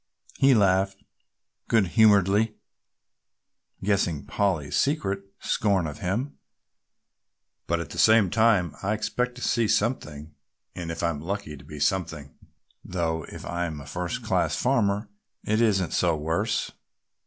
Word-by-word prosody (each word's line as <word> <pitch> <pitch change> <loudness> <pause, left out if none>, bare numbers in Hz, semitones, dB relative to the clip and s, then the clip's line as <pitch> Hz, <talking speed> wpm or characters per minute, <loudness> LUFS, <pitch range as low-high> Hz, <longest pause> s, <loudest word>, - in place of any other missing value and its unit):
he 135 -1 +6
laughed 95 -1 +2 0.6
good 105 -6 +3
humouredly, 105 +1 +4 1.3
guessing 95 -7 0
Polly's 90 -8 -1
secret 105 -10 +1 0.2
scorn 100 -5 +1
of 75 -2 -6
him, 115 +11 -3 1.3
"but 85 0 0
at 80 -4 -6
the - - -6
same 110 -4 +5
time 105 -8 +3
I 100 +2 0
expect 125 +4 -2
to 125 - -11
see 115 -2 +2
something 80 - -1 0.4
and 85 -2 -6
if 80 - -4
I'm 85 -4 -1
lucky 95 -2 -4
to 70 - -14
be 75 +1 -9
something, 75 -3 -1 0.5
though 80 -3 -2
if - - -9
I'm 85 -3 -3
a 70 - -10
first 90 +4 -4
class - - +1
farmer 100 +2 +1 0.4
it 110 +2 +1
isn't 95 -6 +2
so 85 -3 +2
worse. 85 +9 -1
95 Hz, 130 wpm, -26 LUFS, 80-105 Hz, 1.3 s, he